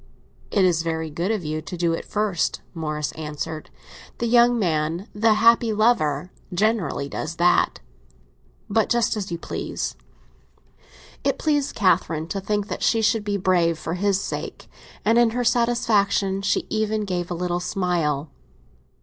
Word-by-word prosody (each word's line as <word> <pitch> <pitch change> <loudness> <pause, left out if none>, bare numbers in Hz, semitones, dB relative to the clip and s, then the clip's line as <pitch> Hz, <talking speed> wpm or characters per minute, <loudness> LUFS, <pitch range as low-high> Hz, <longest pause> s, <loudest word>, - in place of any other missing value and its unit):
"It 195 -2 +3
is 170 -3 +2
very 160 -1 -3
good 170 +6 -2
of 215 -7 -1
you 155 +1 -2
to 180 +3 -7
do 170 -1 +1
it 165 - -4
first," 205 -5 -1
Morris 150 -3 -3
answered. 155 0 -6 0.5
"The 235 - -2
young 240 +1 +5
man—the 185 +5 +1
happy 230 +1 +4
lover—generally 180 - 0
does 155 +3 -5
that. 175 +1 +2 0.9
But 220 +1 +1
just 235 -3 +2
as 200 -4 -4
you 170 - -2
please!" - - -4 1.3
It - - +1
pleased 290 -2 0
Catherine 165 -5 +1
to 195 - -3
think 205 +1 -1
that - - -5
she 225 -1 +2
should 220 0 +2
be 205 -1 -1
brave 175 -3 +2
for 160 +1 -4
his 195 +1 +1
sake, - - -5 0.4
and 225 +2 +4
in 240 -1 +5
her 245 - +1
satisfaction 215 -5 +2
she 200 - 0
even 215 -1 0
gave 180 -2 -3
a 175 - -2
little 175 0 -1
smile. 175 -6 -1
190 Hz, 150 wpm, -23 LUFS, 165-220 Hz, 1.3 s, young